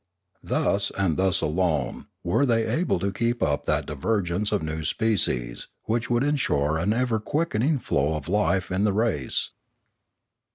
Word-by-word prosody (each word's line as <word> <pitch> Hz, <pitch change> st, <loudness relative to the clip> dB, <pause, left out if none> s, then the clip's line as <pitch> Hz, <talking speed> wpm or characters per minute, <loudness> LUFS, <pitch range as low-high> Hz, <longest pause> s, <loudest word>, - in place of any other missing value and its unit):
Thus 100 Hz, 0 st, +1 dB
and 95 Hz, -5 st, +1 dB
thus 95 Hz, -1 st, +2 dB
alone 80 Hz, -5 st, -1 dB, 0.2 s
were 90 Hz, +11 st, +2 dB
they 115 Hz, -4 st, +2 dB
able 165 Hz, -, 0 dB
to 100 Hz, +3 st, -1 dB
keep 120 Hz, +3 st, 0 dB
up 75 Hz, -1 st, 0 dB
that 75 Hz, 0 st, +1 dB
divergence 90 Hz, +5 st, -1 dB
of 105 Hz, -5 st, 0 dB
new 80 Hz, 0 st, -3 dB
species 75 Hz, -, 0 dB, 0.2 s
which 115 Hz, +1 st, -1 dB
would 120 Hz, +1 st, +2 dB
ensure 80 Hz, -, +1 dB
an 90 Hz, +6 st, +1 dB
ever 120 Hz, -1 st, +1 dB
quickening 145 Hz, +2 st, 0 dB
flow 75 Hz, -, 0 dB
of 75 Hz, -2 st, -5 dB
life 95 Hz, -1 st, +1 dB
in 95 Hz, +2 st, +1 dB
the 105 Hz, -2 st, +2 dB
race. 100 Hz, -, 0 dB
100 Hz, 155 wpm, -25 LUFS, 80-115 Hz, 0.2 s, thus